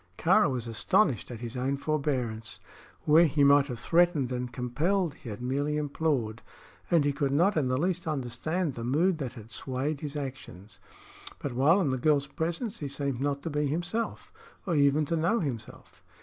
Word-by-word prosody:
Kāra 180 +1 +4
was 125 -3 -2
astonished 115 - +1
at 120 -2 -8
his 120 +1 -6
own 130 +2 -1
forbearance. 130 -7 -2 0.5
Where 160 +3 +6
he 150 -2 +2
might 140 0 +6
have 125 -4 -5
threatened 165 -1 +2
and 125 -1 -3
compelled 150 +9 0
he 120 - -10
had 105 +3 -7
merely 145 +4 0
implored, 140 -7 -1 0.5
and 165 -4 +4
he 145 - +1
could 140 -1 -1
not 175 +8 +3
in 145 -4 +1
the 130 0 +1
least 175 +3 -1
understand 155 +4 -2
the 115 - -6
mood 160 +8 +2
that 130 -4 -4
had 115 -1 -12
swayed 135 +3 -3
his 150 -2 -5
actions. 130 -8 -7 0.6
But 140 - -5
while 145 +10 +4
in 145 -7 +1
the 130 - -1
girl's 145 0 +3
presence 170 - -3
he 145 - -3
seemed 140 -2 -3
not 140 0 -1
to 165 - -3
be 150 0 0
himself, 175 +10 -3 0.3
or 180 - -1
even 145 0 +3
to 165 - -1
know 170 +9 +2
himself. 120 - -6
140 Hz, 185 wpm, -28 LUFS, 125-160 Hz, 0.6 s, Where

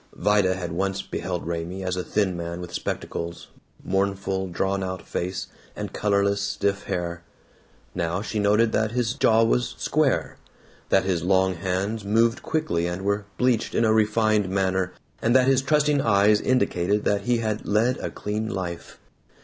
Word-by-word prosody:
Vida 100 -3 +2
had 90 -2 -5
once 95 +3 -1
beheld 90 -2 -4
Raymie 85 +3 -4
as 90 -1 -1
a 90 - -2
thin 100 -4 0
man 85 0 -5
with 90 -1 -8
spectacles, 85 +1 -4 0.3
mournful 95 0 -1
drawn 95 +2 -1
out 95 0 -4
face, 95 +2 -3 0.3
and - - -5
colorless 100 -1 +1
stiff 100 0 -1
hair. 85 -1 -3 0.7
Now 85 +3 -2
she 110 -1 -3
noted 105 +2 +3
that 110 0 0
his 120 -1 0
jaw 115 -4 +4
was 120 +1 +1
square, 150 -2 0 0.5
that - - +4
his 95 -3 0
long 95 +1 +2
hands 95 +5 -2
moved 115 +4 +2
quickly 85 - -1
and 90 +2 -4
were 100 +1 0
bleached 125 -3 +1
in 115 - +3
a 110 - +4
refined 110 -2 +2
manner, 95 -1 0 0.3
and 115 +2 +2
that 130 -1 +6
his 135 0 +4
trusting 150 +1 +2
eyes 105 -2 +4
indicated 105 -6 +1
that 100 -1 +1
he 120 -1 +2
had 110 -2 -2
"led 115 +5 +2
a - - -3
clean 105 +1 -3
life." 90 -5 -5
100 Hz, 165 wpm, -25 LUFS, 95-110 Hz, 0.7 s, that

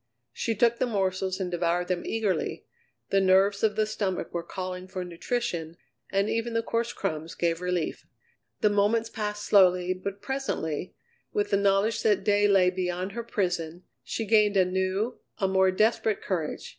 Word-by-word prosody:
She 225 - -1
took 235 +2 +3
the 255 - +1
morsels 190 -3 -1
and 180 -2 -2
devoured 175 0 0
them 180 -1 -1
eagerly; 220 -4 -1 0.5
the 195 - +4
nerves 195 +2 +4
of 215 -2 +2
the 215 0 +2
stomach 205 -4 -3
were 170 - -1
calling 185 +1 -6
for 185 -1 -5
nutrition, 170 -2 -3 0.3
and 195 +1 +1
even 230 +1 -1
the 230 - +1
coarse 230 +1 -1
crumbs 160 -6 -4
gave 170 0 0
relief. 180 -2 -2 0.5
The 210 - +4
moments 220 +3 +2
passed 210 -1 -3
slowly, 180 -2 +4
but 195 +2 -6
presently, 200 - -3 0.4
with 415 -1 0
the 200 - +4
knowledge 200 +2 +2
that 210 -3 +2
day 205 0 +3
lay 190 -2 +4
beyond 180 +1 -2
her 235 +3 -4
prison, 175 -5 -2 0.2
she 225 - -3
gained 210 -2 +4
a 185 - +5
new, 190 +5 -1 0.2
a 195 - +1
more 190 0 +3
desperate 215 +2 +1
courage. 165 -5 -3
195 Hz, 170 wpm, -27 LUFS, 180-215 Hz, 0.5 s, a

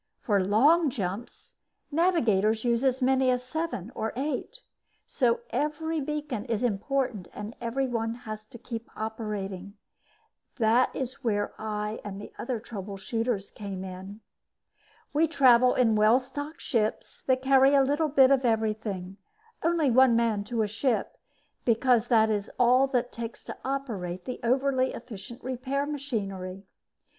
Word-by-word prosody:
For 200 -4 +1
long 290 - +4
jumps, 205 0 -5 0.3
navigators 225 - +2
use 235 0 +1
as 260 -1 +1
many 260 0 +3
as 250 0 +1
seven 255 - -4
or 220 0 -3
eight. 300 - -3 0.4
So 470 0 +1
every 305 +2 -1
beacon 295 -6 -3
is 230 -1 -1
important 240 -2 -1
and 210 +2 -6
every 240 +3 -1
one 230 -2 -2
has 215 -3 -8
to 235 - -11
keep 230 0 -7
operating. 205 -3 -5 0.8
That 235 +1 +3
is 260 0 -5
where 205 -3 0
I 210 0 -3
and 200 -1 -6
the 205 - -10
other 240 -1 -2
trouble 205 -3 -7
shooters 225 0 -2
came 195 -3 -6
in. 190 +3 -8 0.9
We 315 +3 +3
travel 255 -5 +5
in 225 -3 +3
well 215 +3 +5
stocked 290 +4 -7
ships 220 -5 -1
that 260 0 +2
carry 270 +1 +5
a 275 - +6
little 295 +3 +1
bit 275 -2 +6
of 270 -1 +4
everything; 215 -5 -1 0.4
only 330 -5 +2
one 255 0 +6
man 225 -3 +1
to 230 0 0
a - - 0
ship 225 +4 -1 0.5
because 240 0 +3
that 220 -3 +4
is 205 -1 -1
all 255 +2 +4
it 245 0 +1
takes 230 0 -7
to - - -8
operate 210 -10 -3
the 250 - -5
overly 260 +1 +1
efficient 230 +1 -9
repair 260 +3 -2
machinery. 200 -10 -4
235 Hz, 145 wpm, -28 LUFS, 215-265 Hz, 0.9 s, a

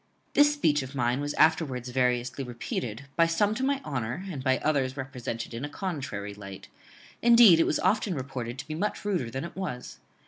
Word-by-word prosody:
This 290 0 +6
speech 155 - +2
of 130 +1 -8
mine 125 +1 +1
was 145 0 -3
afterwards 145 -6 +2
variously 125 +1 0
repeated, 120 -1 -5
by 165 +2 +4
some 200 +6 +2
to 250 +4 -3
my 275 0 +1
honour, 135 +6 -3
and 135 -6 -6
by 130 -1 +3
others 140 -3 0
represented 125 -3 -5
in 115 +3 -5
a 145 - -3
contrary 130 - -4
light; 100 -1 -10 0.5
indeed, 235 -7 +8
it - - +4
was - - +1
often 210 -3 +1
reported 130 -3 -5
to 140 - -7
be 155 - -4
much 205 +6 -3
ruder 180 - -1
than 135 +6 -4
it 170 - -9
was. 170 -10 -5
135 Hz, 195 wpm, -28 LUFS, 125-170 Hz, 0.5 s, indeed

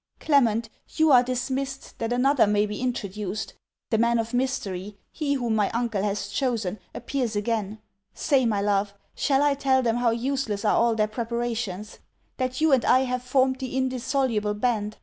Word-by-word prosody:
Clement, 235 -7 +2 0.3
you 315 -1 +4
are 250 -2 +8
dismissed 265 +2 -4
that 230 0 -2
another 255 0 +3
may 210 0 +2
be 210 +2 -5
introduced. 210 -4 -3 0.4
The 220 - +2
man 235 +1 +3
of 230 +1 -2
mystery, 205 -6 -2
he 285 -2 -1
whom 240 -4 -1
my 210 -2 +2
uncle 230 -4 0
has 200 -1 -2
chosen, 215 -5 -1 0.2
appears 250 -5 -2
again. 210 -1 -1 0.4
Say, 270 -5 +2
my 205 -3 0
love! 200 0 0 0.2
shall 275 -1 +2
I 290 -1 +3
tell 270 -2 +2
them 230 -1 +1
how 245 -1 +2
useless 235 -3 -2
are - - +3
all 235 -1 +3
their 215 -1 +2
preparations? 230 -3 -4 0.4
that 255 -1 -2
you 315 0 +3
and 260 -3 +4
I 255 - +4
have 250 -1 -1
formed 260 +1 +1
the 260 -1 -4
indissoluble 255 -4 0
band? 215 -2 -1
235 Hz, 170 wpm, -25 LUFS, 210-260 Hz, 0.4 s, are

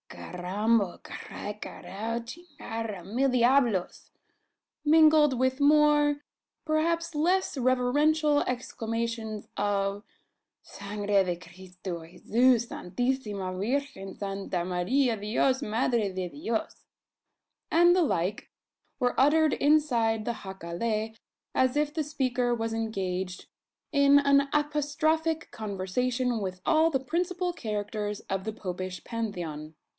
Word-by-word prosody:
"Carrambo! 195 +3 -1
carrai! 205 - -7
carajo 230 +4 -5
chingara! 230 - -7
mil 250 +8 +1
diablos!" 245 -6 +2 0.7
mingled 305 -3 +5
with 260 +2 +1
more 295 0 +4 0.4
perhaps 330 +2 0
less 350 +5 +1
reverential 290 +4 +2
exclamations 230 -3 -3
of 200 0 0 0.6
"Sangre 205 0 -1
de 180 -1 -1
Cristo! 180 0 -8
Jesus! 235 +7 +2
Santissima 205 -2 -2
Virgen! 200 -1 -3
Santa 195 -3 -3
Maria! 225 +8 +1
Dios! 230 +6 +1
Madre 225 -3 0
de 185 -1 -3
Dios!" 235 - -4 0.8
and 345 +1 +5
the 365 - +4
like, 195 - -1 0.5
were 245 0 0
uttered 305 +3 +4
inside 240 -8 +2
the 235 -2 -3
jacale, 205 +4 -3 0.4
as 260 +2 +2
if 295 0 +1
the 315 - -1
speaker 255 -4 0
was 225 -1 -3
engaged 190 -5 -3 0.5
in 280 -1 +5
an 280 0 +4
apostrophic 305 +2 0
conversation 230 +5 -1
with 185 -2 -4
all 320 0 +4
the 270 -4 0
principal 355 +5 -2
characters 210 - -3
of 195 0 -4
the 220 - -3
Popish 185 -3 -5
Pantheon. 170 -9 -5
235 Hz, 105 wpm, -28 LUFS, 200-290 Hz, 0.8 s, mingled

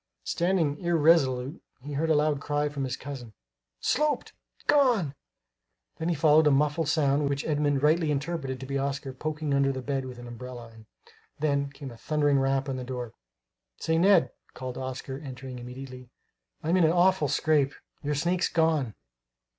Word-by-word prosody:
Standing 170 -5 0
irresolute, 155 -5 +2 0.2
he 145 +1 -6
heard 160 +3 0
a 160 - +4
loud 150 -1 +2
cry 145 0 0
from 140 -2 -3
his 125 -1 -3
cousin. 130 -5 -8 0.5
"Sloped! 300 0 0 0.3
gone!" 245 - +3 0.9
Then 170 +1 0
followed 155 0 +5
a - - +7
muffled 150 +3 +2
sound 145 -2 +2
which 140 0 -2
Edmund 145 -2 +1
rightly 155 +1 +3
interpreted 140 -2 -2
to 130 - -7
be 140 +1 -2
Oscar 140 -1 -3
poking 150 +1 -3
under 140 0 +3
the 130 -1 -5
bed 135 0 -2
with 125 -1 -8
an 120 - -9
umbrella; 120 0 -8
and, 110 -1 -16 0.5
then, 140 -2 0
came 140 -2 -9
a 115 - -12
thundering 145 +1 +2
rap 135 +1 +1
on 135 -1 -2
the 130 - -4
door. 125 -2 -5 0.6
"Say, 160 0 0
Ned," 190 -1 +5 0.2
called 130 -1 -5
Oscar, 130 +1 -5
entering 130 -3 -8
immediately, 125 0 -9 0.5
"I'm 165 +4 +2
in 180 - +4
an 160 - +5
awful 180 -2 +3
scrape! 145 -1 +2 0.3
Your 150 0 -1
snake's 175 +5 +1
gone!" 160 - +1
145 Hz, 165 wpm, -28 LUFS, 130-160 Hz, 0.9 s, a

